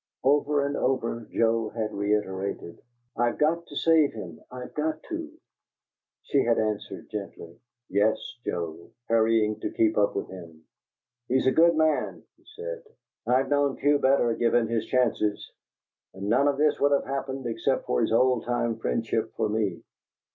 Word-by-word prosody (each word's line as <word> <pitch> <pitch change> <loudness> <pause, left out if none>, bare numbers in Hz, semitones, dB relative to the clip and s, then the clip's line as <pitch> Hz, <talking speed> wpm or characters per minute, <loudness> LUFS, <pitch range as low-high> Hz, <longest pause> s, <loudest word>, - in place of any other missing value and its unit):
Over 145 +1 +3
and 140 - -2
over 115 -3 -1
Joe 115 -1 +1
had 110 -1 -3
reiterated: 100 -3 -2 0.3
"I've 120 0 0
got 165 +3 +1
to - - -11
save 160 -3 +3
him! 90 -7 -8
I've 125 0 -8
got 155 +1 -2
to!" 330 -2 -6 0.9
She 140 - +2
had 115 -1 +2
answered 110 -2 -3
gently, 90 -5 -7 0.3
"Yes, 105 +3 +2 0.3
Joe," 85 -1 -4 0.2
hurrying 110 -1 +2
to - - -3
keep 110 -1 +2
up 100 - +2
with 100 - -2
him. 85 -4 -11 0.6
"He's 130 +1 +1
a 130 - +5
good 170 +2 +5
man," 155 -1 +1
he - - -31
said. 480 +1 -6 0.5
"I've 130 +2 +2
known 145 -1 +1
few 145 0 +3
better, 130 -4 +3
given 115 0 +2
his 115 -1 -1
chances. 115 -5 0 0.6
And 95 +1 -5
none 140 +5 +4
of 140 -1 +1
this 150 +1 +2
would 145 0 +3
have 140 - +1
happened 135 -1 -4
except 115 -1 -1
for 60 - 0
his - - +1
old 125 0 +3
time 120 -2 -1
friendship 115 0 -1
for 110 -2 0
me. 105 -5 -1
115 Hz, 160 wpm, -26 LUFS, 105-140 Hz, 0.9 s, a